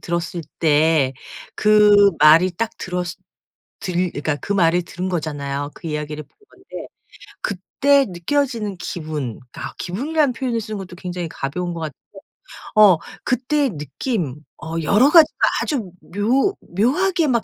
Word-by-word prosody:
들었을 170 0 -3 0.2
때 155 -3 +3 0.4
그 210 -1 +6
말이 160 +5 +6
딱 220 +6 -3
들었으 180 -1 -4 0.6
들 180 -1 -1
그니까 145 0 -2
그 200 - -3
말을 175 -2 +3
들은 180 +2 -5
거잖아요. 145 -3 -3
그 - - -10
이야기를 150 0 -4
본 - - -36 0.2
건데 380 - -10 0.6
그때 275 +8 +2
느껴지는 215 +2 -1
기분 155 -8 -5
그니까 - - -7
기분이라는 275 - 0
표현을 240 -2 -2
쓰는 215 0 -5
것도 180 -2 -9
굉장히 180 -2 -5
가벼운 175 +6 -4
것 165 - -6
같은데 150 -4 -5 0.8
어 205 -5 +7 0.3
그때의 265 +2 +1
느낌 150 - -3 0.3
어 165 0 -5
여러 225 - +4
가지로 320 -2 +6 0.2
아주 225 - -2
묘 245 - 0
묘하게 315 - +1
막 235 -3 +1
180 Hz, 290 characters per minute, -21 LUFS, 160-235 Hz, 0.8 s, 어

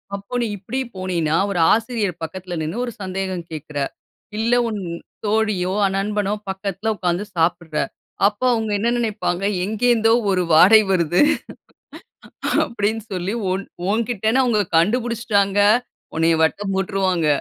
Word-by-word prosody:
அப்போ 200 +4 -10
நீ - - +1
இப்பிடி 220 +7 -4 0.2
போனீயின்னா, 175 -4 -1
ஒரு 180 - -1
ஆசிரியர் 220 -5 -1
பக்கத்தில 180 +2 -6
நின்னு 160 +7 -3
ஒரு 240 - -5
சந்தேகம் 185 -2 -3
கேட்கிற, 150 -1 -7 0.6
இல்ல 230 +2 +1
உன் 215 -2 -3 0.5
தோழியோ, 205 -4 +1 0.2
நண்பனோ, 205 0 -1 0.2
பக்கத்தில 200 +3 -2
உட்கார்ந்து 180 0 -1
சாப்பிட்ற. 165 -1 0 0.5
அப்போ 205 +4 -2
அவுங்க 220 -2 -1
என்ன 230 +3 +1
நினைப்பாங்க? 215 -5 -1 0.2
எங்கேருந்தோ 225 +2 +2 0.2
ஒரு 185 - +2
வாடை 200 +7 +8
வருது 175 -2 +2 1.4
அப்பிடின்னு 220 -1 -2
சொல்லி, 185 +3 -2 0.2
உன் 190 +2 -1 0.3
உன்கிட்டன்னு 225 +2 +1
அவுங்க 225 -5 +2
கண்டுபிடிச்சுட்டாங்க. 210 0 +1 0.6
உன்னைய 165 0 +3
வட்டம் 195 +5 0
போட்டுருவாங்க. 190 -4 0
200 Hz, 120 wpm, -21 LUFS, 180-220 Hz, 1.4 s, வாடை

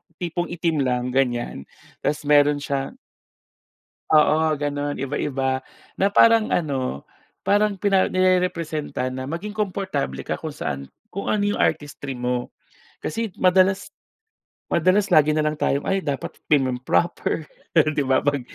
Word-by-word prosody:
tipong 175 0 -3
itim 165 -2 -1
lang 125 0 -1
ganyan. 120 - -1 0.3
Tas 150 +1 -2
meron 145 0 +4
siya 140 -1 -3 1.2
Oo, 155 0 +4
gano'n 145 0 -2
iba-iba. 135 -1 -1 0.4
Na 195 - +4
parang 225 +2 +5
ano, 135 - -1 0.4
parang 205 0 +2
pina 195 -1 +2
nirerepresenta 170 -7 0
na 130 0 -5
maging 170 +8 -4
komportable 190 - -2
ka - - -3
kung - - -6
saan 70 0 -4 0.2
kung 200 - -5
ano 210 -1 +1
'yong 205 0 0
artistry 145 -2 -1
mo. 125 0 -2 0.5
Kasi 225 +6 -3
madalas 190 +1 +3 0.7
madalas 185 +3 +2
lagi 155 -2 +6
na 155 0 +1
lang 150 0 0
tayong, 140 +1 +1
"Ay, 195 0 +1
dapat 145 -5 -4
timum 130 -4 +2
proper." 165 +2 0 0.3
'Di 155 -1 +3
ba, 130 0 +3
'pag 145 -1 0
150 Hz, 135 wpm, -23 LUFS, 135-185 Hz, 1.2 s, lagi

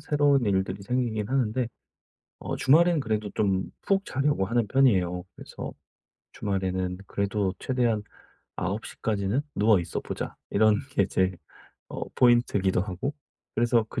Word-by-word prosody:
새로운 145 -3 +3
일들이 95 -1 0
생기긴 115 -3 -1
하는데 125 -2 0 0.7
어 - - -4
주말에는 165 +4 +5
그래도 110 -5 -1
좀 95 -3 0
푹 195 0 +1
자려고 140 -7 +1
하는 115 0 +1
편이에요. 95 -10 +3
그래서 - - -8 0.6
주말에는 95 -2 -2
그래도 100 -1 -1
최대한 120 -5 +1 0.6
'9:00 95 +4 -4
까지는 105 +3 0 0.2
누워 105 -2 +5
있어 85 -1 -3
보자.' - - -5
이런 110 +1 +4 0.2
게 100 - +4
제 95 0 +1 0.6
어 - - -5
포인트기도 120 -7 +3
하고 100 +9 -3 0.4
그래서 115 -1 +3
그 - - -4
110 Hz, 295 characters per minute, -27 LUFS, 95-125 Hz, 0.7 s, 주말에는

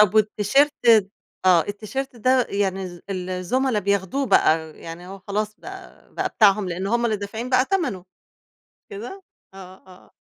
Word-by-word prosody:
طَب 210 0 +5
والتيشيرت 215 +7 +3 0.7
آه، 180 -2 +6
التيشيرت 220 +6 -5
ده 255 +2 +2
يعني 195 -1 -1 0.3
ال 185 -1 -4
الزُملا 220 +6 0
بياخدوه 200 +7 -1
بقى، 160 -7 +2
يعني 165 +2 -9
هو 195 +1 -9
خلاص 210 +2 -3
بقى 380 0 -12
بقى - - -1
بتاعهم 200 -2 +3
لأن 180 +2 -3
هم 235 +3 +1
اللي 220 -2 +1
دافعين 220 +5 -6
بقى 255 0 +4
تمنه، 330 - -1
مش 185 0 -31 0.7
كده؟ 245 - -8 0.3
آه، 185 -1 -11
آه. 185 -1 -17
205 Hz, 150 wpm, -23 LUFS, 185-250 Hz, 0.7 s, آه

